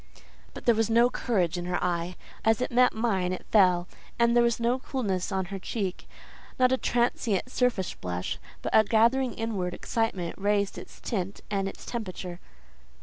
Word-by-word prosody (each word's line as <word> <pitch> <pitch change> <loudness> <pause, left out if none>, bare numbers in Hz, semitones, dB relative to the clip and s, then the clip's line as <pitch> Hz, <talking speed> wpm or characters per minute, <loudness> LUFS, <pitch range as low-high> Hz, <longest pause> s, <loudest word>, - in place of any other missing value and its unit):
But - - -9
there 235 - +6
was 225 0 +1
no 235 +2 +5
courage 180 -10 0
in 175 - -5
her 180 0 0
eye; 175 0 -1 0.3
as 225 +1 +3
it 250 - -2
met 250 +1 +5
mine, 200 -6 0
it 185 - -5
fell; 180 -4 +4 0.3
and 235 0 +3
there 240 - +6
was 235 -1 +2
no 240 +2 +1
coolness 205 -9 -2
on 190 -1 0
her 195 - -3
cheek—not 215 +5 -3
a 260 - +3
transient 240 -2 0
surface 245 -9 +1
blush, 90 0 -4 0.2
but - - 0
a 220 - +8
gathering 235 +3 +3
inward 200 -6 -2
excitement 200 -7 -2
raised 200 0 +1
its - - -12
tint 195 -3 -3
and 195 -1 0
its - - -11
temperature. 185 -6 -5
210 Hz, 170 wpm, -28 LUFS, 185-235 Hz, 0.3 s, a